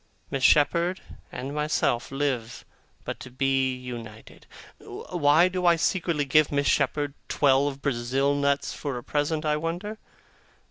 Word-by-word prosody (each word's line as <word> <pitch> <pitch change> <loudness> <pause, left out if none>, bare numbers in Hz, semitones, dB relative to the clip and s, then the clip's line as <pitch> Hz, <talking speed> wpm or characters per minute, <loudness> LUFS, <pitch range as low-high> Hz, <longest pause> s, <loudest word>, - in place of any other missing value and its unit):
Miss 135 - -2
Shepherd 170 +7 +3 0.3
and 135 +3 -6
myself 150 -5 0
live 135 -4 -3 0.4
but - - -5
to - - -9
be 130 0 0
united. 120 -4 -10 0.3
Why 160 0 +2
do 185 -1 -1
I 170 - +6
secretly 165 -3 0
give 155 +2 +3
Miss 145 0 0
Shepherd 145 0 +1 0.2
twelve 140 0 +2
Brazil 135 +1 0
nuts 140 0 0
for 140 -4 -4
a 120 - -7
present, 150 +1 -1
I 150 0 +1
wonder? 175 +7 -4
145 Hz, 135 wpm, -26 LUFS, 135-155 Hz, 0.4 s, I